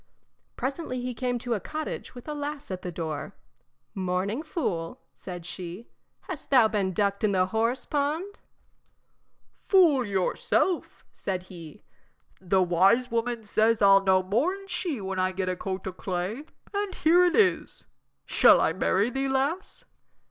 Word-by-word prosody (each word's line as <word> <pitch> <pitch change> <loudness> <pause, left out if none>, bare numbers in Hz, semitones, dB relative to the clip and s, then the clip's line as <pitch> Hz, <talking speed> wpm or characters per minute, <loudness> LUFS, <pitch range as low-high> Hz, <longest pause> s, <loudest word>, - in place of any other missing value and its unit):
Presently 270 -1 -3
he 250 0 -3
came 245 +1 -2
to 240 0 -2
a 215 - -1
cottage 310 +1 -6
with 245 - -11
a 300 - -3
lass 290 -4 -5
at 185 -1 -4
the 180 - -5
door. 160 -3 -5 0.6
"Morning, 190 +6 -1
fool," 205 - -3
said 175 -3 -8
she; 180 +5 -7 0.3
"hast 365 -8 -7
thou 250 -5 +6
been 205 -3 -1
ducked 200 +1 0
in 210 -2 +2
the 185 -1 +3
horse 230 +5 -1
pond?" 310 +8 -2 1.2
"Fool 335 -9 +4
yourself," 205 - -1
said 185 -2 -4
he, 165 -4 -11 0.6
"the 190 0 +2
wise 190 +8 +3
woman 235 0 -1
says 220 +1 +2
I'll 195 -1 +6
know 190 -1 +3
more 240 - +1
'n 390 0 -12
she 355 - -3
when 190 -1 -4
I 185 0 +1
get 185 0 -2
a 185 - -1
coat 190 +1 -5
o' 190 - -4
clay, 185 +9 -4 0.3
and 405 -1 -2
here 340 +3 +4
it 355 -1 +3
is. 390 -5 +1 0.4
Shall - - +6
I - - +2
marry 205 +6 +1
thee, 270 +2 -1
lass?" 280 +8 -2
225 Hz, 155 wpm, -27 LUFS, 185-290 Hz, 1.2 s, thou